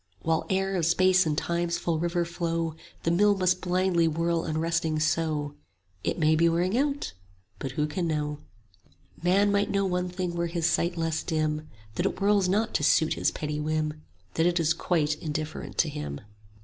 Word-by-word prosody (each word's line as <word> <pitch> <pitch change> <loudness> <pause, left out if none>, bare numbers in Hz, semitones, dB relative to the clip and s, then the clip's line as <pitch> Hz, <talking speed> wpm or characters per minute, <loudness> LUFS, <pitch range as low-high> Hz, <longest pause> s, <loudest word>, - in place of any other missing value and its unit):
"While 160 0 0
air 195 0 0
of 165 -3 +1
Space 185 +1 +4
and 150 -1 0
Time's 170 0 -1
full 170 -2 -1
river 175 +1 0
flow 165 -2 -2 0.3
The 165 - +1
mill 205 +3 +4
must 185 -1 +2
blindly 180 -2 +2
whirl 165 +1 0
unresting 160 0 0
so: 155 -2 0 0.5
40 - - 0
It - - -2
may 155 -1 +3
be 170 +1 +4
wearing 175 +5 +1
out, 285 +2 0 0.5
but 135 -2 -4
who 150 +2 0
can 170 +3 -2
know? 150 -2 -2 0.8
"Man 195 +4 +3
might 200 0 +1
know 200 0 +1
one 180 -1 -1
thing 180 -1 -3
were 170 0 -1
his 170 -1 -2
sight 170 +1 +1
less 165 -1 -1
dim; 155 -2 -1 0.3
That - - +2
it - - -4
whirls 200 -1 +3
not 215 +4 +1
to - - 0
suit 155 +1 +4
his - - +1
petty 150 0 -4
whim, 155 0 -2 0.3
That 165 +1 +2
it 175 0 +1
is 165 0 +3
quite 155 -3 0
indifferent 155 0 -4
to - - +3
him. 70 -1 -5
170 Hz, 190 wpm, -27 LUFS, 155-180 Hz, 0.8 s, Space